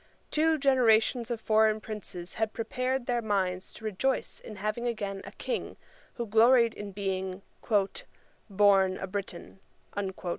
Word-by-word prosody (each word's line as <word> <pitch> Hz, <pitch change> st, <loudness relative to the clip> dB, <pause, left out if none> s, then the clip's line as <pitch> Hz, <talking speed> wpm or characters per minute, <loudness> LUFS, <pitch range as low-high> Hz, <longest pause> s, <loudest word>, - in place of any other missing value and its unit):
Two 320 Hz, +1 st, +3 dB
generations 245 Hz, -3 st, +3 dB
of 235 Hz, -2 st, -2 dB
foreign 220 Hz, 0 st, +3 dB
princes 195 Hz, -5 st, -7 dB
had 220 Hz, -1 st, -1 dB
prepared 255 Hz, +2 st, -2 dB
their 240 Hz, -1 st, 0 dB
minds 190 Hz, -4 st, -1 dB
to 220 Hz, -, -11 dB
rejoice 220 Hz, +6 st, -1 dB
in 215 Hz, -, -10 dB
having 215 Hz, +4 st, -2 dB
again 200 Hz, -4 st, -3 dB
a -, -, -8 dB
King, 485 Hz, -, -4 dB, 0.4 s
who 235 Hz, -, -3 dB
gloried 230 Hz, +2 st, +5 dB
in 205 Hz, -1 st, -7 dB
being 190 Hz, -1 st, -3 dB, 1.1 s
'born 195 Hz, -2 st, +4 dB
a -, -, -4 dB
Briton.' 190 Hz, -1 st, -6 dB
215 Hz, 135 wpm, -29 LUFS, 195-240 Hz, 1.1 s, gloried